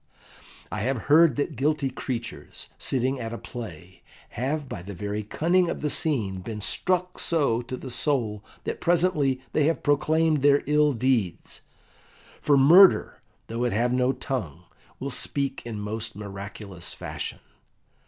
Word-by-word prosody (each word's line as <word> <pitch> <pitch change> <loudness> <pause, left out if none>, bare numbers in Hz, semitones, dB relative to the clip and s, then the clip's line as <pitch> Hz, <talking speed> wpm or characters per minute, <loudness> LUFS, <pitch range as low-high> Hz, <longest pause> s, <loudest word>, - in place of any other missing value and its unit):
I - - -3
have 130 +5 0 0.2
heard 165 0 +6
that 145 +1 -2
guilty 140 +1 0
creatures, 120 -2 -6
sitting 130 +1 0
at 115 -1 -4
a - - -4
play, 100 -6 -9 0.3
have 140 +4 -2
by 125 -9 -6
the 100 +2 -8
very 105 +3 -3
cunning 170 - +1
of - - -4
the 150 - -1
scene 110 - -1
been 110 +2 -6
struck 180 - -1
so 140 -8 +1
to 130 +1 -6
the 130 - -8
soul 115 -7 0 0.2
that - - -4
presently 165 -7 +2
they 150 - +3
have 165 +2 0
proclaimed 155 +1 +2
their 140 0 +4
ill 150 0 +3
deeds; 115 -7 -1 0.8
for 145 -1 +4
murder, 175 +8 +6 0.2
though 115 +2 -3
it 120 - 0
have 120 +4 +1
no 125 +1 +2
tongue, 120 - -4 0.4
will 140 +1 -4
speak 140 +1 -1
in 110 -3 -5
most 110 +1 -4
miraculous 100 -2 -7
fashion. - - -5
130 Hz, 150 wpm, -26 LUFS, 110-150 Hz, 0.8 s, heard